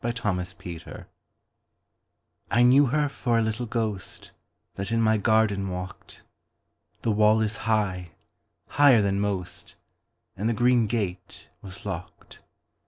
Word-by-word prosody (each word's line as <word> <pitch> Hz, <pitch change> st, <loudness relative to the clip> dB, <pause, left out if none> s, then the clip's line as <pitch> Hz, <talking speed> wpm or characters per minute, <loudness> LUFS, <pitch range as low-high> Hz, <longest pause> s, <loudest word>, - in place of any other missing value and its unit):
The -, -, -1 dB
Little 120 Hz, -4 st, -1 dB
Ghost 90 Hz, -2 st, -7 dB, 1.4 s
I 120 Hz, -, +3 dB
KNEW 135 Hz, +3 st, +6 dB
her 150 Hz, +3 st, +1 dB
for 120 Hz, -4 st, -1 dB
a -, -, +3 dB
little 110 Hz, +2 st, -2 dB
ghostThat 105 Hz, -5 st, -4 dB, 0.6 s
in 115 Hz, -, +1 dB
my 110 Hz, -1 st, +3 dB
garden 105 Hz, -2 st, +2 dB
walked; 90 Hz, 0 st, -7 dB, 0.8 s
The 115 Hz, -, +1 dB
wall 105 Hz, +1 st, +4 dB
is 110 Hz, -1 st, -1 dB
high—higher 105 Hz, -, +1 dB
than 100 Hz, 0 st, 0 dB
most—And 100 Hz, +1 st, -5 dB
the -, -, +1 dB
green 120 Hz, 0 st, +3 dB
gate 100 Hz, -5 st, -4 dB
was 95 Hz, 0 st, -10 dB
locked. 90 Hz, -2 st, -7 dB
110 Hz, 115 wpm, -26 LUFS, 95-115 Hz, 1.4 s, KNEW